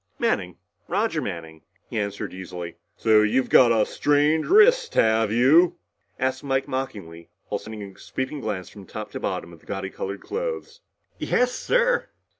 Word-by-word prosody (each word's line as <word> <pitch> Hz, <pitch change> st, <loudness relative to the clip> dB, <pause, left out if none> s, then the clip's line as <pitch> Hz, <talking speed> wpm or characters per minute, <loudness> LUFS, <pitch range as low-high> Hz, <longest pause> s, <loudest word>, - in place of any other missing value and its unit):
"Manning. -, -, -1 dB, 0.3 s
Roger -, -, 0 dB
Manning," 80 Hz, -2 st, -6 dB, 0.3 s
he 110 Hz, -, -3 dB
answered 100 Hz, -1 st, -4 dB
easily. 90 Hz, -2 st, -7 dB, 0.2 s
"So 110 Hz, -1 st, +5 dB
you've 110 Hz, +5 st, +1 dB
got 120 Hz, -2 st, +7 dB
a 110 Hz, -2 st, +3 dB
strained 150 Hz, +2 st, +2 dB
wrist, 475 Hz, +4 st, +5 dB
have 110 Hz, -1 st, +3 dB
you?" 145 Hz, +10 st, +5 dB, 0.4 s
asked 130 Hz, +1 st, -1 dB
Mike 135 Hz, -1 st, 0 dB
mockingly 100 Hz, -11 st, -5 dB, 0.2 s
while -, -, -1 dB
sending 110 Hz, -1 st, -8 dB
a 100 Hz, -1 st, -11 dB
sweeping 130 Hz, +3 st, -4 dB
glance 100 Hz, -5 st, -3 dB
from 100 Hz, -3 st, -13 dB
top -, -, -7 dB
to -, -, -5 dB
bottom 85 Hz, -, -4 dB
of 85 Hz, -, -14 dB
the -, -, -25 dB
gaudy 95 Hz, -1 st, -4 dB
colored 100 Hz, +1 st, -5 dB
clothes. 480 Hz, +1 st, -5 dB, 0.4 s
"Yes, 250 Hz, 0 st, +2 dB
sir." -, -, +1 dB
110 Hz, 160 wpm, -24 LUFS, 95-145 Hz, 0.4 s, got